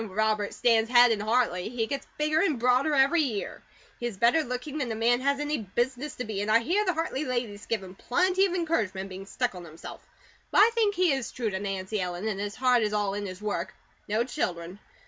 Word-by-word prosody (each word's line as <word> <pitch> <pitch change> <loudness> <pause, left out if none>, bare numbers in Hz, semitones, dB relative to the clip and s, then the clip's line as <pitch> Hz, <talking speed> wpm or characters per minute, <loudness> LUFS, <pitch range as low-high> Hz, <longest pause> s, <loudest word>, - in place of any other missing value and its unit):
"Robert 215 0 0
stands 230 -2 +3
head 245 -1 +7
in 220 - 0
Hartley. 215 -4 0
He 230 -1 -1
gets 275 +4 -5
bigger 305 +1 +2
and 315 -8 +1
broader 255 +5 +3
every 280 +5 +4
year. 230 -9 -3 0.4
He 240 - -2
is 220 -5 -7
better 240 +10 +4
looking 270 +2 -4
than 255 -5 -2
a - - -2
man 235 +2 +2
has 280 +2 0
any 295 +1 -1
business 245 +7 -2
to 250 - -4
be; 215 -3 -4
and 205 - -2
I 220 - +6
hear 350 - +1
the 365 -3 +1
Hartley 315 -3 -2
ladies 240 -6 -3
give 225 -4 -1
him 185 -1 -10
plenty 365 - +2
of 365 - -3
encouragement 220 - -1
in 195 - -9
being 190 +1 -8
stuck 245 +2 -1
on 180 -1 -9
himself, 165 0 -10 0.5
but - - -1
I 440 +3 +7
think 430 -3 +2
he 360 -2 +3
is 265 -3 -3
true 230 -4 -2
to 190 - -3
Nancy 195 +1 -3
Ellen, 180 +3 -3
and 205 -3 -2
his 205 0 -4
heart 250 -1 +3
is 210 -1 0
all 205 -2 0
in 205 0 -3
his 185 +2 -9
work. 190 -3 -3 0.3
No 215 +3 +1
children. 180 -6 -4
235 Hz, 235 wpm, -27 LUFS, 205-275 Hz, 0.5 s, head